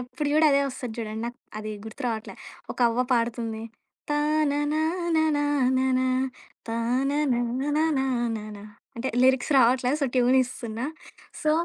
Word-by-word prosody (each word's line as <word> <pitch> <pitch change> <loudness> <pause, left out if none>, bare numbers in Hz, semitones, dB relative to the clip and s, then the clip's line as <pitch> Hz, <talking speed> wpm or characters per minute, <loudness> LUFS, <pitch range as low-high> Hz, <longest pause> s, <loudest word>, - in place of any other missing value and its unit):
ఎప్పుడు 270 +5 -4
చూడు - - +1
కూడా 315 - +6
అదే 280 - +4
వస్తది 250 -3 -6
చూడండి. 220 0 -4
నాకు 240 +1 -7 0.2
అది 215 0 -5 0.2
గుర్తు 220 +6 -9
రావట్లే. 225 -2 -4 0.4
ఒక - - -16
అవ్వ 230 +2 0
పాడుతుంది. 230 -1 -2 0.5
తాననాన 305 +3 +1 0.2
నాననా 260 -3 +2 0.6
తాన 240 +4 0 0.2
నాన 255 +6 0 0.2
నాననా 225 -5 -2 0.3
అంటే 245 +3 -2
లిరిక్స్ 260 +2 +3
రావట్లే 250 0 +4
సో, 280 - +2
ట్యూన్ 250 +1 +4
ఇస్తున్నా 235 -2 -5 0.6
సో 305 - +1
255 Hz, 130 wpm, -26 LUFS, 230-285 Hz, 0.6 s, కూడా